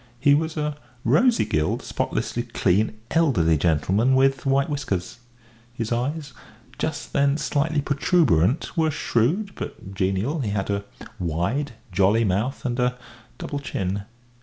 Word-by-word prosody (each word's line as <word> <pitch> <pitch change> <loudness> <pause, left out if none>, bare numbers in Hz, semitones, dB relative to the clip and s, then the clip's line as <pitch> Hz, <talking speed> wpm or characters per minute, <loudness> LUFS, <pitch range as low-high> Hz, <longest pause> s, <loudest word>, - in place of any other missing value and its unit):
He 140 +2 +5
was 160 +2 0
a 150 -1 -2 0.3
rosy 210 - +4
gilled, 75 0 0
spotlessly 120 - -2
clean, 110 -2 +1
elderly 115 - +3
gentleman, 90 - +2
with 135 0 +2
white 135 0 +3
whiskers; 115 -10 -3 0.6
his 115 -2 -3
eyes, 140 +4 -2 0.5
just 155 - -3
then 140 +1 +3
slightly 150 0 0
protuberant, 140 - +2
were 160 -2 +2
shrewd, 155 - 0
but 95 - -7
genial; 95 - 0
he 120 -7 -1
had 100 0 -1
a 100 0 -2 0.3
wide, 90 - -1 0.2
jolly 100 +5 +3
mouth 105 +8 -1
and 120 0 -1
a 125 0 +1 0.4
double 145 - -4
chin. 100 -7 -3
125 Hz, 135 wpm, -24 LUFS, 100-145 Hz, 0.6 s, He